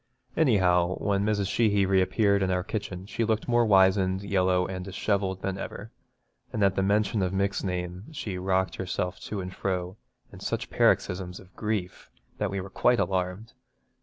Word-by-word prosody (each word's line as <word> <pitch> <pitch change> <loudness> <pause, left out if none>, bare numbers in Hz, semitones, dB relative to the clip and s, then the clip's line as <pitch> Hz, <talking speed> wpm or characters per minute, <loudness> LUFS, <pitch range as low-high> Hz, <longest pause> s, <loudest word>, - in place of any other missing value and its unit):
Anyhow, 95 - +3
when 100 -1 0
Mrs. 105 -2 +1
Sheehy 100 -1 +2
reappeared 100 +2 +2
in 95 - +1
our 90 -1 0
kitchen 95 -3 -5
she 115 - -2
looked 110 -1 0
more 120 -1 +4
wizened, 95 -1 +4
yellow, 95 -2 +2
and 95 -1 -5
dishevelled 95 0 -1
than 95 0 -2
ever, 110 +3 -7 0.6
and 110 -4 0
at 100 -1 +4
the 95 - 0
mention 105 +2 +1
of 90 -1 0
Mick's 100 +1 0
name 90 - -4
she 105 -11 -5
rocked 95 -1 0
herself 90 -1 -3
to 105 -2 -5
and 90 0 -6
fro 90 0 -2 0.4
in - - -10
such - - -3
paroxysms 90 0 +1
of 95 0 -17
grief 105 -4 -3 0.3
that 105 - 0
we 100 0 -3
were 95 0 -7
quite 125 +5 +3
alarmed. 95 +3 -2
95 Hz, 170 wpm, -27 LUFS, 90-105 Hz, 0.6 s, more